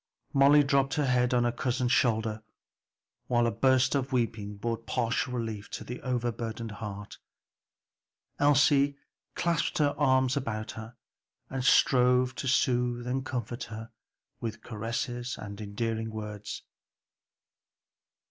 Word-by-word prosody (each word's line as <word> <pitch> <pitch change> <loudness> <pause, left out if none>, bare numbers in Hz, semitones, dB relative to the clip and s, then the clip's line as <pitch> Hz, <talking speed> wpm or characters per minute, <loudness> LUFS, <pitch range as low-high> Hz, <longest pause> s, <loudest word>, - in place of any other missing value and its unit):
Molly 140 +2 +6
dropped 135 -1 +2
her 150 -2 +1
head 125 -1 +2
on 125 -1 +3
her 120 - +2
cousin's 125 0 -1
shoulder 110 -3 +1 0.9
while 120 -1 +2
a 115 - +2
burst 130 0 +3
of 135 -1 -1
weeping 110 -5 -1
brought 115 +2 -3
partial 120 0 0
relief 110 -4 -4
to - - -6
the 125 - -7
overburdened 115 -2 -3
heart. 105 -1 -7 1.2
Elsie 145 0 +4 0.4
clasped 170 -3 0
her 145 -2 +2
arms 130 -2 +3
about 110 -6 -3
her 110 +2 -9 0.6
and 130 -1 -2
strove 125 -1 +4
to 135 - -5
soothe 120 -1 +1
and 130 +2 -1
comfort 120 -1 -4
her 110 +1 -8 0.5
with 115 -1 -5
caresses 120 +2 -3
and 100 0 -8
endearing 110 +2 -3
words. 105 -1 -6
120 Hz, 125 wpm, -29 LUFS, 110-130 Hz, 1.2 s, Molly